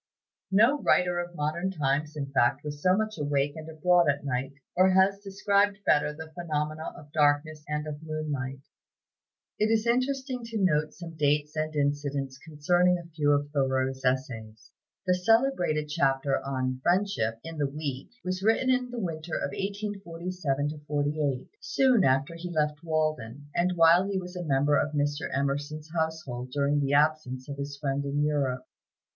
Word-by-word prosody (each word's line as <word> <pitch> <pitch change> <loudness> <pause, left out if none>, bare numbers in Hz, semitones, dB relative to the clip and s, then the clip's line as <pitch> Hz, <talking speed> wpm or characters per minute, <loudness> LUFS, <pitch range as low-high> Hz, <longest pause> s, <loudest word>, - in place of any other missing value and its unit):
No 230 +9 +4
writer 180 -1 +3
of 175 0 -5
modern 155 +5 -1
times, 150 -3 -1
in 140 -2 -4
fact, 130 +1 +2
was 145 -1 -6
so 185 +3 +4
much 215 -4 -2
awake 145 -1 0
and 160 0 -8
abroad 170 +1 +3
at 140 +1 0
night, 130 0 -2 0.2
or 185 +1 +5
has 190 +1 +4
described 200 0 +1
better 150 0 +3
the 160 +1 -9
phenomena 155 -2 -3
of 145 -1 -14
darkness 150 +1 +2
and 150 0 -2
of 150 -1 -6
moonlight. 150 -4 -4 1.0
It 215 - +3
is 225 0 +2
interesting 255 +1 0
to 230 -1 -4
note 155 -6 +1
some 170 -2 -9
dates 150 0 +1
and 155 0 -2
incidents 140 -2 -1
concerning 175 +4 +2
a 170 -1 -11
few 150 -2 0
of 145 0 +1
Thoreau's 130 -1 0
essays. 115 -5 -2 0.3
The 180 - +3
celebrated 180 - +2
chapter 135 -3 +1
on 130 -1 -2
"Friendship," 175 - +1
in 165 -1 -7
the 145 -2 +1
"Week," 140 -2 -5
was 185 0 -2
written 225 +5 +3
in 250 -1 +1
the 245 - -7
winter 165 -5 -3
of 140 - -2
1847 180 -7 -3
48, 145 -2 -1
soon 255 -6 +3
after 135 +3 +2
he 170 +2 -6
left 150 -1 -1
Walden, 155 -4 -2
and 180 +1 +1
while 170 +3 +5
he 200 - -1
was 180 0 -6
a 180 - -4
member 145 -1 +2
of 150 - -1
Mr. 145 +1 0
Emerson's 145 +3 -2
household 160 -7 -3
during 145 +2 +1
the 140 0 0
absence 145 -4 +1
of 140 -1 -6
his 140 0 -5
friend 140 -1 -1
in 140 +1 0
Europe. 135 -4 0
150 Hz, 165 wpm, -28 LUFS, 140-180 Hz, 1.0 s, or